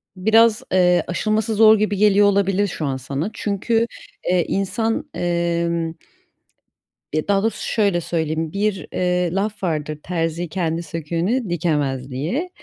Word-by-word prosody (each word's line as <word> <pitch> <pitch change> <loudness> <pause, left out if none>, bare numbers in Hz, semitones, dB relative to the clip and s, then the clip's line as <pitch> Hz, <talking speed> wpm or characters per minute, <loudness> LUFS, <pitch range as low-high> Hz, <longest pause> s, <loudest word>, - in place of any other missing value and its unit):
biraz, 220 +3 +4
eee, 180 -1 +4
aşılması 215 +4 0
zor 220 0 +7
gibi 205 -2 0
geliyor 205 0 +5
olabilir 200 0 +2
şu 160 -4 -4
an 135 -1 -1
sana. 140 - -3
Çünkü, 225 +3 0 0.4
eee, 180 -2 +2
insan, 220 +4 -1
emm, 170 -1 0 1.3
ya 155 0 -1
daha 200 -1 +3
doğrusu 225 - -2
şöyle 200 -5 +2
söyleyeyim. 160 -1 -2
Bir, 200 -1 -1
eee, 180 -1 +1
laf 200 +1 -2
vardır; 155 -3 -2
terzi 165 0 -2
kendi 165 -1 -2
söküğünü 170 - -2
dikemez 145 -6 -1
diye. 205 - -2
180 Hz, 135 wpm, -21 LUFS, 165-205 Hz, 1.3 s, zor